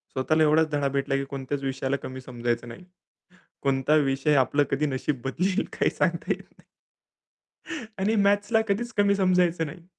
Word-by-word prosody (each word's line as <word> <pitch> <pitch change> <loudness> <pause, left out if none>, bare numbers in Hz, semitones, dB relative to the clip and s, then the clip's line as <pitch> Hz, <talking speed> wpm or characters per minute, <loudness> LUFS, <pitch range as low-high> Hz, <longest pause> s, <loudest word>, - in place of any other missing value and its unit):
स्वतःला 155 +4 +2
एवढाच 155 +1 +4
धडा 145 -1 +1
भेटला 135 0 -1
की 135 - -1
कोणत्याच 140 +1 -4
विषयाला 135 0 -1
कमी 130 0 -6
समजायचं 120 -2 -3
नाही. 120 +9 -10 0.8
कोणता 135 +2 +2
विषय 135 +3 +1
आपलं 145 +2 +3
कधी 135 +2 +1
नशीब 135 -1 -2
बदलेल 180 +8 0
काही - - +2
सांगता - - -1
येत - - -2
नाही. - - -25 1.3
आणि 210 +4 +1
मॅथ्सला 205 +3 +3
कधीच 230 +4 -1
कमी 200 0 +4
समजायचं 180 -3 +2
नाही. 165 +3 -10
145 Hz, 155 wpm, -26 LUFS, 135-180 Hz, 1.3 s, एवढाच